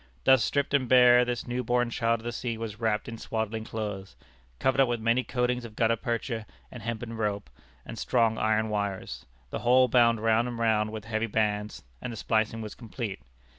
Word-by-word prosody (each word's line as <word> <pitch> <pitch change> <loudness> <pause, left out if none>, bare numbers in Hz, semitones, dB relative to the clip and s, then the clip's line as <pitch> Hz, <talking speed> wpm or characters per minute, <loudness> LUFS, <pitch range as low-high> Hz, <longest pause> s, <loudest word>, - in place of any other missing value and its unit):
Thus 130 -4 +5
stripped 140 +5 0
and 130 -4 +2
bare 125 -1 +7
this 120 -1 -3
new 125 +1 -2
born 120 0 +1
child 115 -1 0
of - - -16
the 120 - -3
sea 120 -1 -4
was 110 -1 -6
wrapped 110 -2 0
in 115 -1 -7
swaddling 110 0 -3
clothes, 105 -4 -5 0.4
covered 130 - +2
up 135 - +4
with 120 -1 -1
many 115 +3 +2
coatings 125 0 -1
of 115 -2 -10
gutta 115 0 +2
percha, 115 -1 -3 0.2
and 125 - -9
hempen 115 +1 -4
rope, 105 -2 -2 0.3
and - - -8
strong 115 -2 +1
iron 110 0 +1
wires, 100 -2 -3 0.2
the - - -3
whole 125 +1 +5
bound 115 -2 +4
round 115 +2 +2
and 120 -1 -5
round 110 -2 +1
with 110 -1 -7
heavy 115 0 -1
bands, 105 -1 -1 0.2
and 125 - -4
the 115 - -7
splicing 110 +1 0
was 105 - -7
complete. 115 - -6
115 Hz, 200 wpm, -28 LUFS, 110-120 Hz, 0.4 s, bare